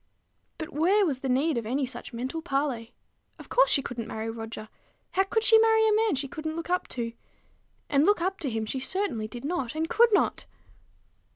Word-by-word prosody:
But 315 - -7
where 375 +8 +3
was 280 -7 -1
the 265 - -3
need 270 +1 +2
of 230 - -7
any 265 +4 0
such 255 - -8
mental 255 +7 -4
parley? 275 -6 -2 0.4
Of - - -13
course, - - +4
she 275 - +3
couldn't 235 -4 -5
marry 220 0 -4
Roger. 225 -1 -7 0.4
How 380 - +2
could 415 +3 0
she 450 0 +7
marry 445 0 +4
a 430 - +3
man 435 -5 +2
she 275 +1 -3
couldn't 315 +3 -5
look 335 +1 -5
up 360 - 0
to? 230 -1 -2 0.7
And 280 0 +3
look 410 +4 +4
up 375 +3 -1
to 285 - -2
him 225 -2 -2
she 260 +5 -3
certainly 260 - -1
did 240 +3 -8
not, 285 -6 -2
and 320 +1 -1
could 470 +4 +5
not. 410 - +1
295 Hz, 205 wpm, -27 LUFS, 245-385 Hz, 0.7 s, she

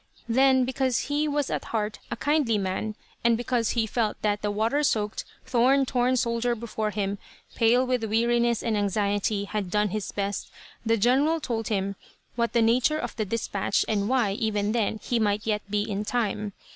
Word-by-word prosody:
Then, 260 +2 +4
because 260 0 -1
he 300 +1 +1
was 290 -2 -1
at - - -2
heart 210 -2 -2
a - - -2
kindly 280 -3 +1
man, 200 +2 -2 0.3
and 235 -1 +4
because 240 -1 0
he 225 - +3
felt 220 -1 -1
that 210 -1 +1
the 210 - -1
water 220 +8 +1
soaked, 215 -7 0 0.2
thorn 260 +3 +3
torn 250 0 +1
soldier 235 0 0
before 220 -1 -3
him, 200 -1 -2 0.3
pale 240 +2 +3
with 250 -3 0
weariness 235 +1 +1
and 230 -2 0
anxiety, 205 0 0
had 200 -1 -3
done 210 +2 +1
his 210 +1 -3
best, 200 -1 -3 0.3
the 230 0 +2
general 270 +9 +3
told 230 -6 -3
him 200 -2 -1 0.4
what 235 -1 +1
was - - -33
the 235 - +4
nature 250 +7 +3
of - - -4
the 215 - -1
dispatch, 200 -2 -1
and 205 -1 0
why, 250 -6 +2
even 210 0 -1
then, 220 -1 0
he 240 - 0
might 210 -1 0
yet 210 -1 0
be 205 0 +1
in 205 -1 -2
time. 210 -3 -2
225 Hz, 185 wpm, -26 LUFS, 210-245 Hz, 0.4 s, Then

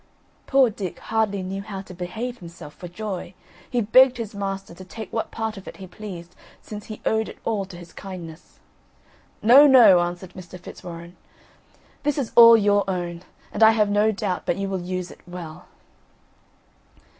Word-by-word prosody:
Poor 270 -4 +4
Dick 195 -4 -6
hardly 215 -3 -1
knew 190 +1 -4
how 200 -2 -7
to 185 - -12
behave 220 +8 -5
himself 170 -4 -11
for 180 - -9
joy. 190 0 -6 0.3
He 245 -2 0
begged 255 +4 +5
his 225 -3 -5
master 195 -2 -5
to 185 - -11
take 215 +3 -9
what 225 - -2
part 220 -1 -4
of 195 - -11
it - - -9
he 195 - -9
pleased, 180 -3 -9 0.2
since 210 -1 -9
he 215 - -9
owed 220 0 +1
it - - -11
all 210 -4 -1
to 190 -2 -11
his 175 -1 -13
kindness. 175 -4 -10 0.9
"No, 265 +7 +8
no," 240 -9 +8
answered 175 +1 -4
Mr. 180 0 -11
Fitzwarren, 170 0 -10 0.8
"this 295 0 -1
is 270 -5 -2
all 230 -1 +10
your 205 -1 +3
own; 175 -2 -3 0.3
and 205 - -5
I 220 0 +8
have 210 -2 +2
no 210 +2 +3
doubt 185 -3 -3
but - - +1
you 195 0 -3
will 190 -2 -3
use 180 0 -4
it - - -15
well." 175 -3 -9
195 Hz, 180 wpm, -23 LUFS, 180-220 Hz, 0.9 s, all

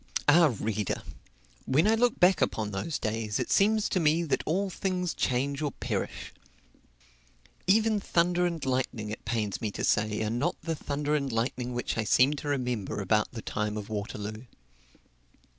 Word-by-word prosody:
Ah, 150 -3 +6
reader! 105 -2 -2 0.6
when 150 +9 +3
I 220 - +5
look 240 +1 +2
back 180 +1 +5
upon 105 -2 0
those 100 +11 -2
days, 110 -1 -2
it - - -2
seems 215 +1 +3
to 185 - +1
me 160 +1 +3
that 160 - 0
all 190 +4 0
things 180 -3 -1
change 135 +3 -1
or 145 -3 -1
perish. - - -4 1.3
Even 215 +2 +4
thunder 180 -1 +2
and 165 -4 -4
lightning, 125 -5 -1
it 110 - -7
pains 105 -2 -2
me 110 - -1
to - - -4
say, 105 +1 +1
are 110 - -1
not 130 +9 -1
the 165 0 -1
thunder 145 -1 -2
and 140 -3 0
lightning 120 +2 -2
which 120 -1 -2
I - - +1
seem 130 +6 +4
to 145 - -6
remember 125 -9 -2
about 105 +2 +1
the 115 -3 -6
time 105 0 -2
of 105 0 -6
Waterloo. 105 +1 -5
130 Hz, 170 wpm, -28 LUFS, 110-170 Hz, 1.3 s, Ah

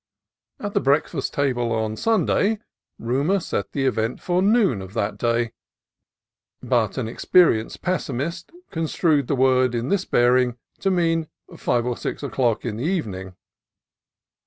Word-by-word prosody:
At 205 -1 -4
the - - +3
breakfast 140 +1 +1
table 125 -4 0
on 110 -1 -1
Sunday 220 - +2 0.4
rumor 140 +12 +1
set 100 - -3
the 135 -2 -1
event 115 -2 0
for 180 0 0
noon 200 - +3
of 95 +2 -10
that 100 +1 -2
day, 115 -1 0 1.1
but 120 -4 +1
an 125 -4 -1
experienced 115 -1 +2
pessimist 170 0 -2 0.2
construed 160 -3 +1
the 140 - +1
word 130 -1 +3
in 120 +3 -2
this 200 -2 +1
bearing 125 0 +3 0.2
to 195 - +1
mean 165 -3 +1 0.3
five 120 -1 0
or 125 -1 -1
six - - -5
o'clock 125 -5 0
in 110 -3 -3
the 120 - -4
even 160 - -1
ing. 95 0 -8
130 Hz, 145 wpm, -23 LUFS, 115-170 Hz, 1.1 s, the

